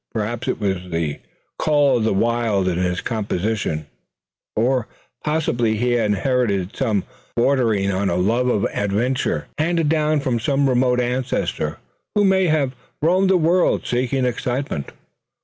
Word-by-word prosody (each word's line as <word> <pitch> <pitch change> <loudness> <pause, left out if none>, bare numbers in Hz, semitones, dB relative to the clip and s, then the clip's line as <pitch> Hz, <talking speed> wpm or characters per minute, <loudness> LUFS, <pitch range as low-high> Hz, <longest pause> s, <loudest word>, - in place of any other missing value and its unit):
Perhaps 115 +3 -3
it 130 - -1
was 95 -3 -2
the 80 -4 -2 0.4
"call 145 -4 +3
of 110 - 0
the 110 - +2
wild" 110 -2 +1
in 90 -1 0
his 90 0 0
composition; 105 -7 -2 0.7
or 125 +1 +1 0.4
possibly 120 -8 +1
he 125 +3 +1
had 120 -3 +2
inherited 105 -2 0
some 110 -8 0
trait - - -26 0.3
bordering 115 -6 +2
on 95 +1 0
a 85 - 0
love 115 +8 +1
of 105 -5 +1
adventure, 110 +6 0
handed 165 -1 +1
down 155 -1 +2
from 130 -4 -1
some 140 +4 +1
remote 125 -1 +2
ancestor 120 - -1 0.4
who 205 - +4
may 190 -1 +4
have 145 -5 +1 0.3
roamed 185 +4 +3
the 190 - +5
world 175 +2 +2
seeking 125 +1 0
excitement. 125 - -2
120 Hz, 150 wpm, -21 LUFS, 100-135 Hz, 0.7 s, the